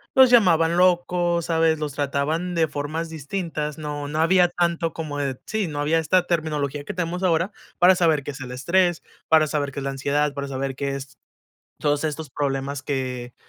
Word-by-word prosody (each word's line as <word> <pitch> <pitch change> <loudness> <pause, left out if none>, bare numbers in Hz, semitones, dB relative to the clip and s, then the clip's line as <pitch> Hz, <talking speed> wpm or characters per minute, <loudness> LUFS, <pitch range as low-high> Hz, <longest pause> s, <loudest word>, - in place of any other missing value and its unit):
los 260 -1 +8
llamaban 170 -8 +4
locos, 175 -1 +2
¿sabes? 160 -1 +2
Los 150 -1 -3
trataban 150 +5 -1
de 160 -2 +2
formas 155 +3 -4
distintas. 155 -1 -4
No, 150 -2 -5
no 155 +2 -3
había 180 +1 +5
tanto 170 -1 -1
como 155 -3 -5
de 135 -3 -2
sí, 220 -3 -1
no 145 -2 -4
había 160 +3 +2
esta 180 +3 +2
terminología 150 -4 -1
que - - -5
tenemos 180 +1 -3
ahora 170 +2 +2 0.3
para 180 +2 +7
saber 160 -5 +2
qué 145 - -5
es 135 - -10
el 125 -2 -7
estrés, 175 +6 +1 0.2
para 155 -1 +5
saber 145 -2 -2
qué 140 - -4
es - - -5
la 140 - -2
ansiedad, 140 +2 0
para 140 0 -4
saber 135 0 -3
qué 140 0 -2
es, 135 -1 -9 0.6
todos 145 0 +1
estos 155 -1 -3
problemas 140 0 -2
que, 125 -3 -3
155 Hz, 190 wpm, -23 LUFS, 140-170 Hz, 0.6 s, los